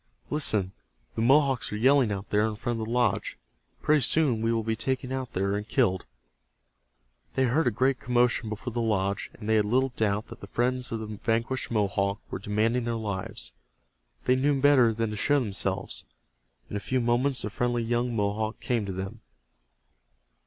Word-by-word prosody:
Listen, 105 -11 +2 0.4
the - - -2
Mohawks 135 +1 +3
are - - -3
yelling 130 0 +4
out 100 0 -5
there 105 +1 +3
in 110 - -3
front 120 +1 -3
of 110 - -3
the - - -5
lodge. 125 0 0 0.5
Pretty 150 -1 +4
soon 130 -3 +2
we 115 0 +1
will 115 -1 0
be 110 0 -1
taken 130 +2 -2
out 130 -2 -4
there 100 +2 0
and 105 +1 -4
killed." 100 -10 +1 1.3
They 130 - +2
heard 130 +5 +2
a - - +6
great 130 +4 +1
commotion 120 -1 +1
before 110 +3 -5
the 120 - -1
lodge, 100 -3 0
and 105 - -9
they 110 0 +4
had 105 - +3
little 130 +5 +2
doubt 105 -1 0
that - - -11
the 100 - -8
friends 125 +4 -1
of 115 -1 -3
the - - -4
vanquished 115 +4 -2
Mohawk 100 -2 0
were - - -3
demanding 110 +5 0
their 120 -1 -1
lives. 100 -4 -3 0.7
They 125 - +4
knew 140 +1 +2
better 135 -4 +5
than 110 0 -2
to - - -4
show 145 +7 +2
themselves. 105 -7 -2 0.6
In - - -7
a - - 0
few 130 +6 -1
moments 125 +3 +1
the 105 - -3
friendly 120 0 0
young 120 +1 0
Mohawk 110 +1 -1
came 115 -5 -1
to - - -3
them. 95 +4 -6
115 Hz, 190 wpm, -27 LUFS, 105-125 Hz, 1.3 s, a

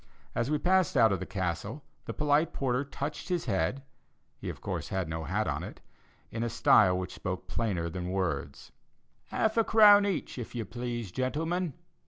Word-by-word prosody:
As 120 - -1
we 150 - +2
passed 180 0 +2
out 115 -3 +6
of 95 - 0
the - - -5
Castle, 95 - -3 0.2
the - - -4
polite 150 +2 +2
porter 130 0 0
touched 145 +4 -5
his 175 -2 0
head 100 +5 0 0.6
(he - - -5
of - - -7
course - - -4
had 95 -3 -1
no 80 0 -4
hat - - -1
on - - -1
it) - - -8 0.5
in 115 - -4
a 120 - 0
style 105 -5 +5
which 90 0 -4
spoke 90 0 -4
plainer 95 -8 -1
than 90 +1 -4
words, 75 -6 -3 0.6
"Half 220 +1 0
a 225 - +5
crown 205 -2 +7
each, 185 -8 -3
if 120 - -7
you 115 -2 -2
please, 120 -1 -5
gentlemen." 160 - -1
120 Hz, 185 wpm, -30 LUFS, 95-150 Hz, 0.6 s, crown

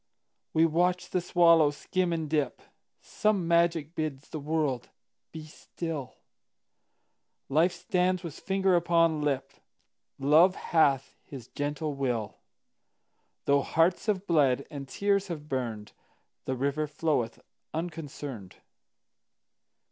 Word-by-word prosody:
We 160 +1 +4
watch 175 +3 +1
the 180 - +1
swallow 170 -3 +5
skim 180 +5 -2
and 160 -2 -2
dip; 150 -4 -1 0.4
Some 205 -5 0
magic 170 -2 +2
bids 155 -4 -4
the 155 - -5
world 145 -4 -1 0.4
be 160 -1 -8
still; 155 -2 -6 1.3
Life 165 +6 +3
stands 185 0 0
with 165 -4 -7
finger 190 -1 +1
upon 165 -2 +3
lip; 140 -2 -1 0.7
Love 160 +7 +5
hath 140 -5 +2
his 130 -4 -10
gentle 145 +1 -3
will; 125 -6 -2 1.1
Though 140 0 +4
hearts 165 +8 +1
have 200 -2 0
bled, 140 -7 +2
and 140 -2 -7
tears 200 -1 +1
have 155 -4 -6
burned, 115 -6 -4 0.5
The 130 - -1
river 140 +4 -1
floweth 150 -6 -1 0.3
unconcerned. 145 - -6
155 Hz, 110 wpm, -28 LUFS, 140-170 Hz, 1.3 s, swallow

